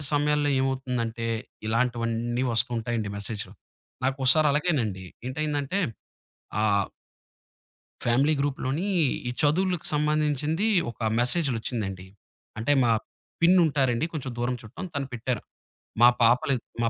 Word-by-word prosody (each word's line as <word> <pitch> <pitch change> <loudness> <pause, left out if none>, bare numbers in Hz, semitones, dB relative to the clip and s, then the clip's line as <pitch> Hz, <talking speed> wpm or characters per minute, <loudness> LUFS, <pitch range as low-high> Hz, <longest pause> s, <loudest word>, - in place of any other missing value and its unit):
అలాంటి 150 - -4
సమయంలో 145 0 +2
ఏమవుతుందంటే, 125 -4 -2 0.4
ఇలాంటివన్నీ 120 +1 0
వస్తు 115 - +2
ఉంటాయండి 115 -2 -2
మెసేజ్‌లో. 100 -1 -4 0.5
నాకోసారలాగేనండి 135 - +2 0.2
ఏంటైందంటే 145 +5 -1 0.8
ఆహ్ 100 -2 +2 1.2
ఫ్యామిలీ 135 +6 +3
గ్రూప్‌లోని 145 +5 -1 0.4
ఈ - - -1
చదువులకు 180 +3 +1
సంబంధించింది 150 +4 +1 0.2
ఒక - - -22 0.2
మెసేజ్‌లొచ్చిందండి. 115 - -1 0.5
అంటే, 120 +6 +1
మా 115 - +3 0.5
పిన్నుంటారండి. 155 -7 +4
కొంచెం 135 -4 -4
దూరం 125 +1 0
చుట్టం 115 - -8
తను 140 -2 -2
పెట్టారు. 120 -1 -2 0.6
మా 120 - +10
పాపలు 125 +4 +4 0.3
మా 115 - +2
130 Hz, 100 wpm, -26 LUFS, 115-150 Hz, 1.2 s, మా